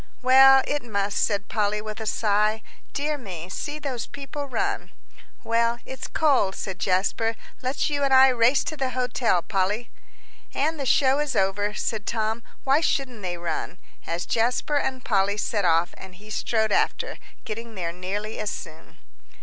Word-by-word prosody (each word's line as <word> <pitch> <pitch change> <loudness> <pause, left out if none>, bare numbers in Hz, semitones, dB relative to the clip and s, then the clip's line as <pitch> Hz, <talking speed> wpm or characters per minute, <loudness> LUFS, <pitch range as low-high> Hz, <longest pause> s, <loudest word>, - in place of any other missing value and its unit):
"Well, 265 +1 +8
it 290 0 -1
must," 205 -3 -1
said 200 -2 0
Polly, 210 -1 0
with 215 0 -6
a 220 - -5
sigh. 215 +1 +1 0.3
"Dear 295 +1 -2
me, 180 -7 -7
see 290 +10 -4
those 270 -6 -4
people 285 +1 -6
run." 395 +9 -2 0.5
"Well, 230 +1 +2
it's 265 -1 -6
cold," 270 -11 +2
said 190 -3 -5
Jasper; 200 +4 +1 0.3
"let's 260 +2 0
you 290 -1 -1
and 275 - +2
I 265 0 +8
race 250 +2 +3
to 310 - -4
the 265 -3 -1
hotel, 245 -7 +1
Polly." 210 +4 -1 0.6
"And 310 +3 0
the 275 - -2
show 270 +2 +4
is 295 -2 -1
over," 205 +2 +1
said 215 -2 -3
Tom, 220 0 -1 0.2
"why 275 +3 +3
shouldn't 255 -8 -1
they 180 -2 -3
run?" 170 +1 -4 0.3
as 170 +1 -2
Jasper 245 +5 +1
and 265 -2 -2
Polly 200 -1 +2
set 210 -2 0
off, 165 +1 +3
and 190 -1 -12
he 210 +3 -13
strode 220 -1 0
after, - - 0 0.3
getting 225 +1 -6
there 170 -3 -2
nearly 195 +5 -4
as 210 - -1
soon. 160 -4 -9
225 Hz, 165 wpm, -25 LUFS, 200-265 Hz, 0.6 s, Well